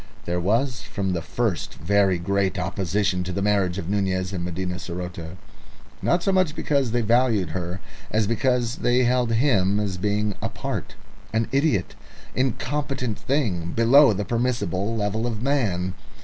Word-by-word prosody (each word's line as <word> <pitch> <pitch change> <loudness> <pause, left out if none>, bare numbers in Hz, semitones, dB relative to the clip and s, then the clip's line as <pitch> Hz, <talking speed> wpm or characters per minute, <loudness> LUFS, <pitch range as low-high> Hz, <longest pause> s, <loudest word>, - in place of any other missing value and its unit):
There 90 +1 -1
was 120 +8 +1
from 95 -2 -2
the 85 - -1
first 105 +3 -2
very 95 +2 +2
great 100 +2 0
opposition 95 +1 0
to 90 - -4
the 100 +2 -2
marriage 100 -3 +2
of 85 - -4
Nunez 95 -1 0
and 90 -2 -3
Medina 90 +1 -3
saroté; 90 -1 -6 0.6
not 175 0 +2
so 195 - +2
much 185 -5 +2
because 140 -4 +1
they 120 +2 +1
valued 115 -3 +2
her 90 0 -4 0.3
as 110 0 +2
because 120 +1 +1
they 125 +1 +2
held 125 -1 +2
him 105 -6 +3
as 100 -3 -2
a - - -10
being 105 +1 0
apart, - - -4 0.4
an 115 0 +1
idiot, 135 - +1 0.4
incompetent 130 -2 -1
thing 95 - -1
below 130 +4 +6
the 105 0 -2
permissible 115 -4 -1
level 110 +2 -1
of 115 -2 -2
a - - -6
man. 100 -10 0
105 Hz, 160 wpm, -24 LUFS, 95-120 Hz, 0.6 s, below